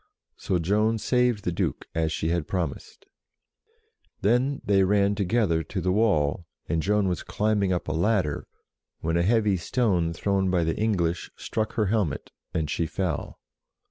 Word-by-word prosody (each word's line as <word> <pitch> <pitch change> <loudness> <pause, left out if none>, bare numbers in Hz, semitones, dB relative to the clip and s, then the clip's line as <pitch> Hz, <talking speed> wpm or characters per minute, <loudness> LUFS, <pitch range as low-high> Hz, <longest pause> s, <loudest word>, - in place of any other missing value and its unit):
So 90 - -1
Joan 105 +6 +1
saved 125 -2 +1
the 90 - -1
Duke, 85 - -2
as 80 -1 0
she 80 +1 -1
had 85 -3 -1
promised. 95 - -4 1.2
Then 125 +7 +2
they 100 -1 +4
ran 100 +1 +3
together 100 -4 +1
to 95 +5 -4
the 90 +1 0
wall, 85 -6 +1 0.2
and 80 -1 0
Joan 105 +2 +2
was 90 -3 -1
climbing 105 -2 0
up 90 - -1
a - - -1
ladder, 85 -2 0 0.5
when 80 +1 -1
a 85 - +3
heavy 105 0 +3
stone 90 -3 +1
thrown 95 +3 0
by 90 -2 +2
the 80 0 0
English 90 -6 0
struck 110 -1 -3
her 110 - +1
helmet, 100 - -1 0.2
and 80 -2 -1
she 85 +3 -1
fell. 80 -1 -3
95 Hz, 160 wpm, -26 LUFS, 85-105 Hz, 1.2 s, they